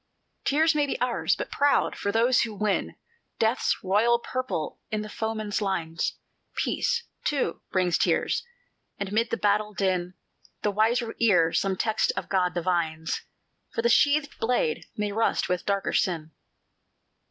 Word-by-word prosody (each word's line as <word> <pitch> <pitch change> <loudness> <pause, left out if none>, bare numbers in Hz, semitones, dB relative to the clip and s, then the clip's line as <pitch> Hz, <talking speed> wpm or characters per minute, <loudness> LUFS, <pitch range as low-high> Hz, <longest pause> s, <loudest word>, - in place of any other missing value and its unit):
"Tears 315 +3 +3
may 295 -1 +1
be - - -3
ours, 250 -1 +1
but - - -5
proud, 285 0 +2
for 200 - -2
those 235 +4 +4
who 225 -3 -2
win 205 0 -1 0.4
Death's 225 +3 +1
royal 215 +5 +3
purple 255 -8 -4
in 215 -1 -2
the 215 - -8
foeman's 220 -1 -2
lines; 170 -5 -1 0.4
Peace, 470 -1 0 0.2
too, 275 - -1
brings 180 -2 +2
tears; - - +1 0.5
and 200 -1 -4
mid 230 +2 +1
the - - -1
battle 210 0 +1
din, 180 -2 0 0.5
The 210 - +2
wiser 225 +3 +1
ear 175 -8 +4
some 195 -1 +1
text 220 +2 +1
of - - -4
God 180 -2 +1
divines, 165 -2 -1 0.5
For 230 - 0
the 235 - +4
sheathed 290 +4 +3
blade 225 -9 0
may 210 -1 -1
rust 225 +2 +1
with 180 -1 -2
darker 200 -1 0
sin. 160 -4 0
210 Hz, 150 wpm, -26 LUFS, 185-235 Hz, 0.5 s, those